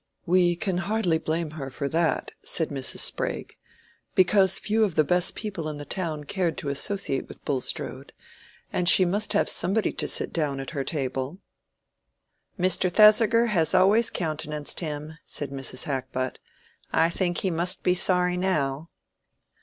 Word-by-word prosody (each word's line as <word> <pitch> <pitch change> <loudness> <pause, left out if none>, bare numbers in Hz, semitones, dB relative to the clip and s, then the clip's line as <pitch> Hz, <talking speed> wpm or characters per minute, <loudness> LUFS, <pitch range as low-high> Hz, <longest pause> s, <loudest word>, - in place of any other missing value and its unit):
"We 175 0 +3
can 180 0 -2
hardly 190 -4 0
blame 160 0 -2
her 140 -3 -6
for 140 +2 -4
that," 160 -2 0
said 160 - 0
Mrs. 135 -2 -3
Sprague; - - -1 0.6
"because 190 0 +4
few 220 +1 +1
of 195 -7 0
the 155 - +4
best 180 +4 +1
people 190 -8 -4
in 150 - -6
the 145 - -7
town 155 -2 -4
cared 170 +1 -2
to 145 - -3
associate 140 0 -1
with - - -11
Bulstrode, 135 -3 -3 0.6
and 180 -1 +4
she 185 - +8
must 205 +4 0
have 205 - +2
somebody 205 +3 +1
to - - -1
sit - - -1
down 145 -4 -1
at 135 - -6
her 140 -4 -3
table." 135 +1 -3 1.2
"Mr. 185 0 +2
Thesiger 220 +3 +6
has 170 -7 +1
always 210 +5 +4
countenanced 150 -3 -3
him," 155 -1 -5
said 145 -2 -5
Mrs. 135 -2 -5
Hackbutt. 130 -2 -3 0.5
"I 165 +1 +2
think 175 0 -1
he 190 - 0
must 175 +3 -1
be 180 - +3
sorry 180 0 +1
now." 155 -5 -1
170 Hz, 155 wpm, -25 LUFS, 145-185 Hz, 1.2 s, she